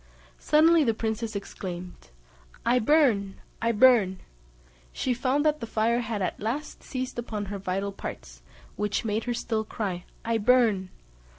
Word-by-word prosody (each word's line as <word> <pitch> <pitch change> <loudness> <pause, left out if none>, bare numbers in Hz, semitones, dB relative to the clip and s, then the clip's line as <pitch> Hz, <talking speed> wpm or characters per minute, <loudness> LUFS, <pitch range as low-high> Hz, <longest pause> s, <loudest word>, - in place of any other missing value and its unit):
Suddenly 320 +1 +5
the 225 -5 +1
princess 220 0 -3
exclaimed, 180 -2 -7 0.6
"I 245 +2 +4
burn! 220 -7 +3 0.3
I 230 +1 +2
burn!" 220 -5 +4 0.7
She 255 - -1
found 265 +4 0
that 305 0 +2
the 230 - -5
fire 225 +2 +1
had 220 -4 -3
at - - -2
last 250 +8 -4
seized 255 -2 -4
upon 215 -3 -4
her 200 - -4
vital 195 +1 -2
parts, - - -8 0.4
which 210 +2 -1
made 220 +1 -1
her 240 -1 -1
still 225 -2 -1
cry 195 -5 -4 0.2
"I 230 0 +1
burn!" 220 -5 +3
225 Hz, 150 wpm, -27 LUFS, 200-250 Hz, 0.7 s, Suddenly